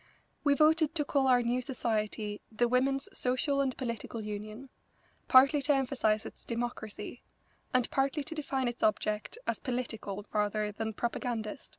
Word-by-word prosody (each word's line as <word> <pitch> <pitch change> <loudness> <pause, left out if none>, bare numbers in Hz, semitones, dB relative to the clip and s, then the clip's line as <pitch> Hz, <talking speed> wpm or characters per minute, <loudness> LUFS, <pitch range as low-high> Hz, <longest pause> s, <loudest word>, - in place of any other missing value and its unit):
We 285 -1 +4
voted 315 +1 +4
to 295 -3 +1
call 275 -2 +2
our 250 -1 +5
new 245 +2 +1
society 215 -4 -2
the 240 +2 +2
Women's 270 +3 +1
Social 260 +3 +1
and 265 -2 -1
Political 230 -2 -4
Union, 215 +5 -6 0.6
partly 275 +3 +7
to 290 +1 +3
emphasise 250 -5 +1
its - - -10
democracy, 235 -3 -5 0.5
and 255 -1 +3
partly 275 +2 +1
to 300 - -6
define 275 -4 -1
its 240 0 -4
object 215 - 0
as - - -1
political 225 -6 -4
rather 210 0 0
than 220 +1 -3
propagandist. 235 +2 -3
245 Hz, 150 wpm, -31 LUFS, 215-275 Hz, 0.6 s, partly